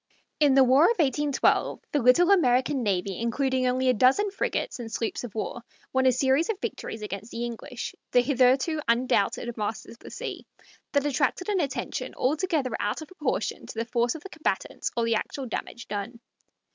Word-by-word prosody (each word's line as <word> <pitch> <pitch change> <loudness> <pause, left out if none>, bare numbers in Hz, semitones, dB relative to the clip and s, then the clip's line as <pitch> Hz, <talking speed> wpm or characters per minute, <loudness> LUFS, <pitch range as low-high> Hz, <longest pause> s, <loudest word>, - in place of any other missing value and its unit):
In 290 -3 +5
the 270 - +7
war 260 +5 +5
of 465 - +3
1812 290 -2 +1
the 290 - +1
little 295 +10 +5
American 260 -6 +3
navy, 195 -3 -1
including 255 +2 0
only 255 +1 +1
a 255 - +5
dozen 265 - +3
frigates 395 - -2
and 225 -2 -6
sloops 225 +2 -3
of 230 -4 -8
war, 230 +2 -3 0.3
won 260 0 +3
a - - +6
series 265 - +2
of 425 -4 -1
victories 220 - -5
against 205 +1 -6
the 235 +1 -4
English, 235 +1 -6 0.2
the 245 - +5
hitherto 265 +4 +2
undoubted 235 -1 +1
masters 215 +1 -4
of 235 - -14
the - - -11
sea, - - -6 0.5
that 285 -1 +2
attracted 290 +6 0
an 400 -3 +1
attention 280 -5 -3
altogether 300 -1 0
out 210 +9 -2
of - - -14
proportion 370 - -3
to - - -9
the 230 - -1
force 240 +1 0
of 320 - -9
the 390 - -8
combatants 315 -3 -2
or 230 - +2
the 230 - +2
actual 265 +5 -3
damage 235 0 -6
done. 205 +4 -5
255 Hz, 185 wpm, -26 LUFS, 235-290 Hz, 0.5 s, the